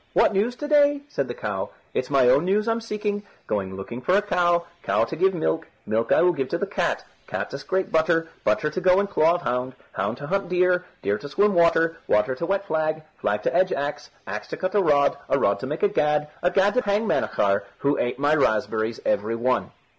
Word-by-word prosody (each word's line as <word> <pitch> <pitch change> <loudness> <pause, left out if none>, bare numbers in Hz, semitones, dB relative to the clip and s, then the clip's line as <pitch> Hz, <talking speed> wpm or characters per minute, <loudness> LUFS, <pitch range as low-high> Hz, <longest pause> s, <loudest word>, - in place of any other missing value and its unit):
"What - - +4
news 215 +5 0
to 295 - -5
day?" 290 -1 +4
said - - -2
the - - -5
cow. - - -4 0.2
"It's - - -2
my 135 -3 +4
own 140 +5 +5
news 205 +4 +1
I'm 230 0 0
seeking. 210 -2 -3 0.2
Going 95 -2 -2
looking 115 +6 -7
for 180 +9 +3
a - - +3
cow, 175 -3 +1 0.2
cow - - +1
to 165 - -4
give 190 +3 +2
me 165 - -4
milk, 160 - -1 0.2
milk 115 +1 -1
I - - +5
will 180 0 +4
give 135 -5 -3
to - - -1
the - - -2
cat, - - -2 0.2
cat - - -4
to 140 - -5
scrape 190 +6 -2
butter, 165 +1 +2 0.2
butter 150 -1 +1
to 185 - -3
go 185 +1 +4
in 200 - +2
claw 170 -4 +3
of 175 - -4
hound, 125 +1 -2 0.2
hound 115 - -2
to 145 - -7
hunt 195 +5 -1
deer, 180 0 +2 0.2
deer 100 +1 0
to 145 - -8
swim 205 +7 +2
water, 165 -1 +3
water 105 +5 +2
to 170 +6 -4
wet 195 0 0
flag, 155 -3 -1 0.2
flag 105 0 -1
to - - 0
edge 185 +1 +3
axe, 145 +1 -3 0.2
axe 105 +2 -5
to - - -6
cut 185 - -2
a 205 - +4
rod, 145 -5 +3
a - - +3
rod 100 -7 +1
to 130 - -5
make 150 +7 -4
a - - +6
gad, 150 -5 +1
a 175 - +3
gad 195 +3 +3
to 250 - +2
hang 205 +1 0
Manachar, 100 - +1
who 140 +1 0
ate 120 0 -1
my 145 +2 +2
raspberries 110 -4 0
every 110 +3 0
one." 125 +2 0
165 Hz, 235 wpm, -24 LUFS, 130-190 Hz, 0.2 s, a